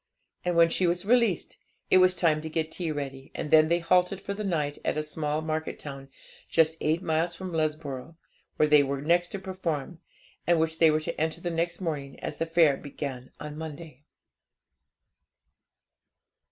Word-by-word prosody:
And 180 Hz, -1 st, 0 dB
when 165 Hz, 0 st, +6 dB
she 180 Hz, -, +2 dB
was 175 Hz, +2 st, -1 dB
released, 230 Hz, -5 st, +2 dB, 0.3 s
it 185 Hz, -, +7 dB
was 185 Hz, 0 st, +5 dB
time 155 Hz, -4 st, +2 dB
to 160 Hz, -, -5 dB
get 160 Hz, 0 st, -2 dB
tea 170 Hz, -1 st, -2 dB
ready; 135 Hz, -2 st, -6 dB
and 150 Hz, -, -4 dB
then 155 Hz, 0 st, +7 dB
they 170 Hz, +1 st, +3 dB
halted 180 Hz, +2 st, +2 dB
for 200 Hz, 0 st, -4 dB
the 210 Hz, +1 st, -5 dB
night 150 Hz, -7 st, -1 dB
at -, -, -1 dB
a 155 Hz, -, 0 dB
small 150 Hz, 0 st, -2 dB
market 160 Hz, 0 st, -3 dB
town, 135 Hz, -2 st, -8 dB, 0.4 s
just 160 Hz, -1 st, +3 dB
eight 160 Hz, +4 st, +1 dB
miles 165 Hz, +2 st, 0 dB
from 185 Hz, +1 st, -6 dB
Lesborough, 155 Hz, -2 st, -2 dB, 0.4 s
where 155 Hz, -, +3 dB
they 150 Hz, -1 st, +6 dB
were 140 Hz, 0 st, -1 dB
next 175 Hz, +4 st, +2 dB
to 200 Hz, -, -5 dB
perform, 180 Hz, -5 st, -4 dB, 0.5 s
and 170 Hz, -1 st, +4 dB
which 160 Hz, 0 st, 0 dB
they 165 Hz, -, +7 dB
were 155 Hz, 0 st, +2 dB
to 155 Hz, -, -4 dB
enter 160 Hz, +1 st, -1 dB
the 175 Hz, 0 st, -3 dB
next 170 Hz, +2 st, -2 dB
morning, 145 Hz, -6 st, -4 dB
as -, -, -5 dB
the 165 Hz, -, -1 dB
fair 165 Hz, -4 st, +4 dB
began 135 Hz, -3 st, -6 dB
on 150 Hz, 0 st, -7 dB
Monday. 155 Hz, -3 st, -8 dB
160 Hz, 180 wpm, -28 LUFS, 150-175 Hz, 0.5 s, it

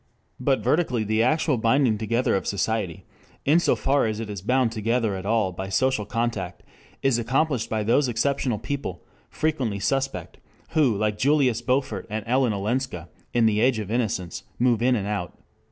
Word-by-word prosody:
But 130 Hz, -2 st, +1 dB
vertically 125 Hz, -3 st, +1 dB
the 110 Hz, +1 st, +1 dB
actual 150 Hz, +2 st, +2 dB
binding 115 Hz, -1 st, +2 dB
together 115 Hz, +2 st, +1 dB
of 95 Hz, -, -2 dB
society, 100 Hz, -3 st, -2 dB, 0.4 s
in 155 Hz, +5 st, +5 dB
so -, -, +2 dB
far 140 Hz, -3 st, +1 dB
as 110 Hz, 0 st, -3 dB
it 110 Hz, -2 st, -5 dB
is 100 Hz, -3 st, -6 dB
bound 125 Hz, +3 st, +2 dB
together 115 Hz, -1 st, 0 dB
at 95 Hz, +1 st, -5 dB
all 110 Hz, -4 st, +2 dB
by 95 Hz, +2 st, -6 dB
social 130 Hz, +1 st, +1 dB
contact, 115 Hz, -6 st, -3 dB, 0.4 s
is 135 Hz, -3 st, +3 dB
accomplished 130 Hz, +2 st, 0 dB
by 110 Hz, -1 st, -1 dB
those 125 Hz, +6 st, +3 dB
exceptional 125 Hz, 0 st, 0 dB
people, 105 Hz, -7 st, -5 dB, 0.3 s
frequently 135 Hz, -10 st, -1 dB
suspect, 135 Hz, +6 st, -2 dB, 0.3 s
who 140 Hz, -10 st, +2 dB
like 105 Hz, 0 st, -1 dB
Julius 130 Hz, -3 st, +3 dB
Beaufort 125 Hz, -4 st, -1 dB
and 110 Hz, +1 st, -4 dB
Ellen 125 Hz, 0 st, +2 dB
Olenska 100 Hz, -, -2 dB, 0.2 s
in 120 Hz, -1 st, +3 dB
"The 105 Hz, -1 st, +3 dB
Age 125 Hz, 0 st, +3 dB
of 105 Hz, -1 st, -4 dB
Innocence" 105 Hz, -7 st, -2 dB, 0.2 s
move 120 Hz, -2 st, +2 dB
in 125 Hz, +1 st, +3 dB
and 100 Hz, -4 st, -2 dB
out. 100 Hz, -4 st, -4 dB
115 Hz, 170 wpm, -25 LUFS, 105-130 Hz, 0.4 s, in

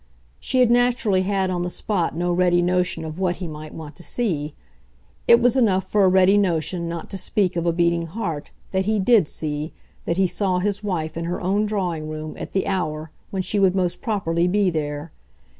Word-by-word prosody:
She 255 Hz, -, +1 dB
had 240 Hz, -2 st, +4 dB
naturally 240 Hz, -5 st, +3 dB
had 190 Hz, -1 st, 0 dB
on 175 Hz, -1 st, -1 dB
the 180 Hz, -, -2 dB
spot 180 Hz, -3 st, -1 dB
no 175 Hz, +1 st, 0 dB
ready 175 Hz, 0 st, +3 dB
notion 180 Hz, -2 st, 0 dB
of 160 Hz, +2 st, -7 dB
what 180 Hz, -2 st, +1 dB
he 180 Hz, -1 st, -6 dB
might 155 Hz, 0 st, -8 dB
want 155 Hz, -2 st, -9 dB
to -, -, -9 dB
see; 165 Hz, -9 st, -2 dB, 0.7 s
it 235 Hz, -, +8 dB
was 245 Hz, +1 st, +3 dB
enough 200 Hz, -7 st, +2 dB
for 210 Hz, -1 st, +2 dB
a -, -, +6 dB
ready 190 Hz, +2 st, +5 dB
notion, 170 Hz, -2 st, -1 dB
not 170 Hz, -1 st, -5 dB
to 195 Hz, -, -4 dB
speak 190 Hz, 0 st, 0 dB
of 170 Hz, 0 st, -1 dB
a -, -, +4 dB
beating 170 Hz, 0 st, +1 dB
heart, 165 Hz, -5 st, -4 dB, 0.2 s
that 190 Hz, 0 st, 0 dB
he 215 Hz, +1 st, +1 dB
DID 205 Hz, -4 st, +4 dB
see, 150 Hz, 0 st, -4 dB, 0.3 s
that 170 Hz, -, -1 dB
he 190 Hz, -, +4 dB
saw 185 Hz, 0 st, 0 dB
his 205 Hz, +2 st, -1 dB
wife 165 Hz, -6 st, -2 dB
in 165 Hz, -, -3 dB
her 175 Hz, +1 st, -2 dB
own 200 Hz, +4 st, +1 dB
drawing 175 Hz, -7 st, -2 dB
room 155 Hz, 0 st, -6 dB
at -, -, -6 dB
the 190 Hz, -, 0 dB
hour 155 Hz, -5 st, -2 dB, 0.2 s
when 190 Hz, -1 st, -2 dB
she 205 Hz, -, -1 dB
would 190 Hz, -1 st, +3 dB
most 180 Hz, -2 st, -1 dB
properly 175 Hz, -6 st, 0 dB
be 195 Hz, 0 st, +2 dB
there. 150 Hz, 0 st, -4 dB
180 Hz, 210 wpm, -22 LUFS, 165-200 Hz, 0.7 s, it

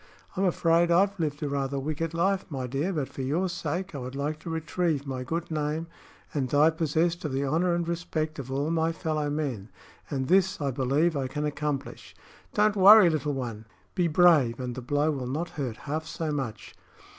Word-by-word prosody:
I'm 195 Hz, +1 st, +1 dB
afraid 170 Hz, -1 st, +3 dB
I've 195 Hz, +3 st, +3 dB
lived 150 Hz, -2 st, -2 dB
a -, -, 0 dB
rather 140 Hz, -1 st, -2 dB
wicked 155 Hz, +3 st, -3 dB
life, 190 Hz, +3 st, +1 dB
my 135 Hz, -4 st, -4 dB
dear; 140 Hz, +9 st, -1 dB
but 150 Hz, -7 st, -2 dB
for -, -, -7 dB
your 155 Hz, +8 st, 0 dB
sake 175 Hz, +2 st, -3 dB
I 140 Hz, -, -5 dB
would 130 Hz, +1 st, -6 dB
like 150 Hz, +2 st, -2 dB
to 165 Hz, -, -8 dB
retrieve 160 Hz, -2 st, -1 dB
my 130 Hz, -2 st, -4 dB
good 165 Hz, +5 st, -4 dB
name 155 Hz, +1 st, -1 dB, 0.5 s
and 135 Hz, -4 st, -1 dB
die 150 Hz, +4 st, +5 dB
possessed 165 Hz, +2 st, 0 dB
of 150 Hz, -, -2 dB
the 135 Hz, +1 st, 0 dB
honor 170 Hz, +5 st, +1 dB
and 170 Hz, -1 st, -2 dB
respect 160 Hz, -3 st, -3 dB
of 130 Hz, -1 st, -6 dB
all 140 Hz, +4 st, -1 dB
my 165 Hz, 0 st, +1 dB
fellow 155 Hz, -2 st, -2 dB
men. 135 Hz, -9 st, -3 dB, 0.4 s
And 135 Hz, -3 st, -2 dB
this, 190 Hz, +2 st, +3 dB
I 140 Hz, -2 st, -1 dB
believe, 140 Hz, +6 st, +1 dB
I 135 Hz, -2 st, -1 dB
can 150 Hz, +3 st, -3 dB
accomplish. 150 Hz, -2 st, -4 dB, 0.4 s
Don't 210 Hz, 0 st, +3 dB
worry, 200 Hz, -2 st, +8 dB
little 150 Hz, -2 st, -1 dB
one! 115 Hz, -4 st, -5 dB, 0.3 s
Be 180 Hz, -3 st, +1 dB
brave, 155 Hz, -8 st, +4 dB
and 125 Hz, -1 st, -3 dB
the 130 Hz, -, -6 dB
blow 145 Hz, +5 st, +1 dB
will 135 Hz, -4 st, -4 dB
not 155 Hz, +7 st, -3 dB
hurt 130 Hz, -9 st, -4 dB
half 155 Hz, +2 st, -3 dB
so 160 Hz, -1 st, -3 dB
much." 115 Hz, -9 st, -4 dB
150 Hz, 200 wpm, -27 LUFS, 135-170 Hz, 0.5 s, worry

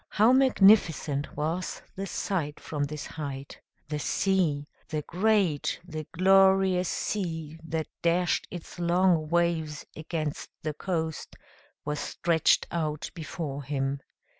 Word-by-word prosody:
How 220 Hz, +4 st, +4 dB
magnificent 195 Hz, -, +4 dB
was 160 Hz, +5 st, -2 dB
the 195 Hz, +1 st, -4 dB
sight 160 Hz, -9 st, -2 dB
from 145 Hz, -2 st, -2 dB
this 150 Hz, 0 st, -6 dB
height! 140 Hz, -3 st, -7 dB, 0.3 s
The 150 Hz, 0 st, -3 dB
sea 170 Hz, -4 st, +1 dB, 0.2 s
the 155 Hz, -1 st, -2 dB
great, 185 Hz, -4 st, +1 dB
the 155 Hz, -3 st, -6 dB
glorious 190 Hz, 0 st, +4 dB
sea, 165 Hz, -6 st, -3 dB
that 160 Hz, -1 st, -2 dB, 0.2 s
dashed 175 Hz, +1 st, +1 dB
its 175 Hz, 0 st, -9 dB
long 175 Hz, -2 st, +3 dB
waves 165 Hz, -3 st, 0 dB
against 155 Hz, -1 st, -4 dB
the 155 Hz, -1 st, -2 dB
coast 160 Hz, -1 st, -3 dB, 0.5 s
was 150 Hz, 0 st, -2 dB
stretched 170 Hz, -2 st, +2 dB
out 155 Hz, -3 st, -2 dB
before 155 Hz, -3 st, -5 dB
him. 135 Hz, 0 st, -2 dB
165 Hz, 115 wpm, -28 LUFS, 150-185 Hz, 0.5 s, How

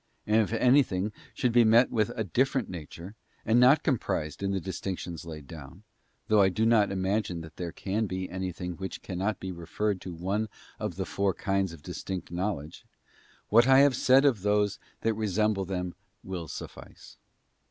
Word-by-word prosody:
And 105 Hz, +1 st, +3 dB
if 110 Hz, -, -2 dB
anything 115 Hz, -5 st, +3 dB, 0.2 s
should 125 Hz, -, 0 dB
be 120 Hz, 0 st, +6 dB
met 115 Hz, +3 st, +5 dB
with 110 Hz, -3 st, +1 dB
of -, -, -9 dB
a 110 Hz, -, 0 dB
different 130 Hz, -, +1 dB
nature, 85 Hz, +2 st, -8 dB, 0.3 s
and 115 Hz, +2 st, +4 dB
not 130 Hz, +5 st, +6 dB
comprised 80 Hz, -, -1 dB
in 100 Hz, -, 0 dB
the 95 Hz, -1 st, 0 dB
dis 95 Hz, 0 st, -6 dB
tinctions 85 Hz, -3 st, -5 dB
laid 75 Hz, -3 st, -8 dB
down—though 95 Hz, -, -3 dB
I 95 Hz, -, +5 dB
do 110 Hz, +4 st, 0 dB
not 110 Hz, -3 st, +4 dB
imagine 95 Hz, -2 st, -1 dB
that 80 Hz, -1 st, -12 dB
there 85 Hz, -2 st, -4 dB
can 105 Hz, +5 st, -2 dB
be 95 Hz, 0 st, -3 dB
anything 90 Hz, -1 st, -5 dB
which 95 Hz, 0 st, -6 dB
cannot 95 Hz, +2 st, -2 dB
be 95 Hz, -, -5 dB
referred 95 Hz, +3 st, -2 dB
to 90 Hz, -, -7 dB
one 100 Hz, +6 st, -2 dB, 0.3 s
of -, -, -3 dB
the -, -, -3 dB
four 100 Hz, -1 st, 0 dB
kinds 95 Hz, -2 st, 0 dB
of 80 Hz, -3 st, -12 dB
distinct 90 Hz, 0 st, -6 dB
knowledge—what 95 Hz, -, -2 dB
I 135 Hz, 0 st, +7 dB
have 140 Hz, -2 st, +5 dB
said 130 Hz, +2 st, +5 dB
of 125 Hz, -9 st, +3 dB
those 105 Hz, 0 st, +1 dB, 0.2 s
that 115 Hz, -, +1 dB
resemble 105 Hz, -1 st, 0 dB
them 90 Hz, -1 st, -3 dB, 0.3 s
will 90 Hz, -3 st, -5 dB
suffice. -, -, -10 dB
95 Hz, 175 wpm, -28 LUFS, 90-110 Hz, 0.3 s, I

